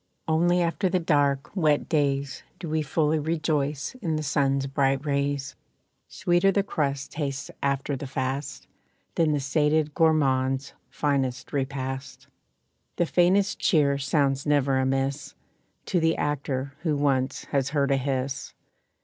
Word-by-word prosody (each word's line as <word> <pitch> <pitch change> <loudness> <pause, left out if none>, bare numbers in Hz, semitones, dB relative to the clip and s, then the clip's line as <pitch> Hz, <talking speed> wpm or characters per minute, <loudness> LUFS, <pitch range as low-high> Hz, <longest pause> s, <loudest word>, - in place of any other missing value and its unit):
Only 175 +2 +3
after 170 +3 0
the 185 - +1
dark, 145 -3 +1
wet 155 -6 +2
days 140 -3 0 0.2
Do 170 - -7
we 155 0 0
fully 155 +1 +1
rejoice 150 - -1
in 160 -2 -1
the 155 - -2
sun's 140 -1 +1
bright 135 +1 0
rays. 140 -1 -1 0.5
Sweeter 175 +3 +2
the 200 +1 +1
crust 140 -7 -2
tastes 140 -2 -4
after 140 0 0
the 135 +1 -6
fast 135 +2 -3 0.5
Than 160 -2 +2
the 145 - +1
sated 150 +2 +1
gourmand's 135 -4 +2 0.2
finest 135 -4 -1
repast. 135 -1 -4 0.7
The 175 - +1
faintest 185 +4 +2
cheer 140 -4 +3
sounds 135 -1 +1
never 140 -2 +2
amiss 135 +2 -1 0.5
To 180 - +1
the 165 0 +2
actor 140 -1 -2
who 160 -3 0
once 135 -2 0
has 140 -1 +1
heard 140 -1 +1
a 135 - +3
hiss. 135 0 -3
140 Hz, 135 wpm, -26 LUFS, 135-155 Hz, 0.7 s, Only